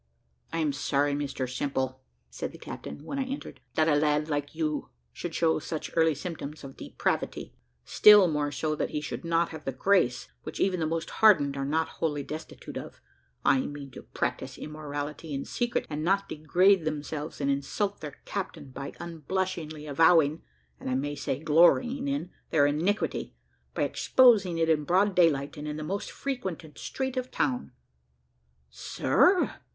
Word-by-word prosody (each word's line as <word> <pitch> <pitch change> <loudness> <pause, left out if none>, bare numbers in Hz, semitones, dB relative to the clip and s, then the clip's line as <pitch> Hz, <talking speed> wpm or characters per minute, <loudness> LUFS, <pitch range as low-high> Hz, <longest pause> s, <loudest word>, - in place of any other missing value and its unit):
"I 165 - -2
am 155 -3 +1
sorry, 145 0 +1
Mr 140 -2 -2
Simple," 130 0 -2 0.3
said - - -4
the - - -10
captain, 145 - -8
when 275 - -3
I - - +1
entered, 275 +2 -6 0.2
"that 155 - +3
a 155 - +4
lad 150 +1 +2
like 145 0 -2
you 155 -2 -2 0.2
should 175 -2 -5
show 160 -2 +2
such 155 0 -5
early 160 -2 +4
symptoms 155 -1 -6
of 135 -1 -9
depravity; - - -3 0.3
still 210 -3 +8
more 150 -2 0
so, 155 +1 -1
that 150 - -1
he 150 - -2
should 150 - -5
not 170 0 +1
have 160 -2 -8
the 135 - -2
grace 130 - +2
which - - -7
even 185 -2 +2
the 160 - 0
most 165 +1 -3
hardened 150 -11 +6
are 135 0 -2
not 160 +2 +1
wholly 150 -3 0
destitute 155 +3 -8
of - - -8 0.5
I 135 - +5
mean 140 0 -5
to - - -10
practise - - -3
immorality 150 0 -5
in 135 - -3
secret, 240 -1 -1
and 150 0 -4
not 195 +3 +2
degrade 180 +5 +3
themselves 155 0 -4
and 140 -1 +1
insult 195 +9 -2
their 150 -2 -8
captain 190 -8 -5
by 140 +2 -6
unblushingly 170 -2 -3
avowing 155 +1 +4 0.4
(I 130 - -2
may 145 +2 -1
say 135 - -2
glorying 240 - +4
in) 280 -10 -2 0.2
their 145 -3 +4
iniquity, 165 +9 0 0.4
by - - +1
exposing 215 -9 +4
it 165 0 +2
in 155 -2 +3
broad 190 +5 +2
day, 170 -2 +6
and 145 +1 -5
in 150 0 -4
the 155 - -4
most 195 +6 -3
frequented 190 - -5
street 265 -1 -3
of 255 - 0
the - - -26
town." 250 -1 -1 1.0
"Sir!" 365 0 +2
155 Hz, 170 wpm, -28 LUFS, 145-185 Hz, 1.0 s, still